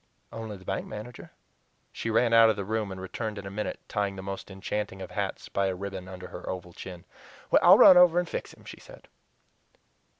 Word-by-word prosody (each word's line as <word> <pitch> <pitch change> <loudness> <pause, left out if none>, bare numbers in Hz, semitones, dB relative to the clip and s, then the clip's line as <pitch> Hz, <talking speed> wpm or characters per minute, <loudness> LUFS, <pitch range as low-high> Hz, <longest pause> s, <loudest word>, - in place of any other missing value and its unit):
"Only 110 -2 -7
the 95 - -17
bank - - -3
manager." 110 +3 -9 0.6
She 115 - -4
ran 115 +1 +2
out 115 -1 +7
of 110 - +2
the 100 -1 -4
room 110 -1 -2
and 95 - -7
returned 105 +3 -5
in 100 - -7
a 95 - -6
minute 105 +2 -4
tying 100 -1 -2
the 95 - -8
most 95 +1 -6
enchanting 95 0 -4
of 95 - -8
hats - - -4
by 100 0 0
a 95 - -2
ribbon 95 -1 -6
under 90 -1 -9
her - - -8
oval 90 -1 -6
chin. 90 -1 -10 0.6
"I'll - - +8
run 185 - +9
over 175 -1 +6
and 175 -1 +1
fix - - -5
him," - - -18
she - - -10
said. - - -15
100 Hz, 210 wpm, -27 LUFS, 95-110 Hz, 0.6 s, run